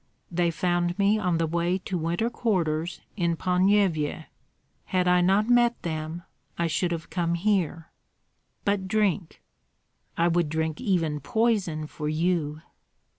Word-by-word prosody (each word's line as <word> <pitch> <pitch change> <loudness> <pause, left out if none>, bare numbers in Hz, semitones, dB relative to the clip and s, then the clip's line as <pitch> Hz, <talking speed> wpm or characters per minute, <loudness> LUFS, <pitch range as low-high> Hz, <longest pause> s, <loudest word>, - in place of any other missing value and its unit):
"They 175 0 +1
found 175 +1 0
me 205 +2 +3
on 180 -4 +1
the 165 - +1
way 170 +3 0
to 190 0 -5
winter 175 +8 -1
quarters 175 -8 -1
in 170 -4 0
Ponyevyej. 180 -5 +2 0.6
Had 180 -2 0
I 180 0 +4
not 195 +4 +3
met 240 0 +4
them 160 0 -4 0.3
I 170 - +1
should 175 +2 0
have 165 -1 -5
come 170 -1 0
here." 170 -4 0 0.7
"But 200 -2 0
drink." 200 -4 0 0.7
"I 170 - +3
would 170 -2 +1
drink 160 +2 -2
even 170 -9 0
poison 195 - 0
for 150 0 -5
you!" 155 -1 -1
175 Hz, 135 wpm, -26 LUFS, 160-195 Hz, 0.7 s, I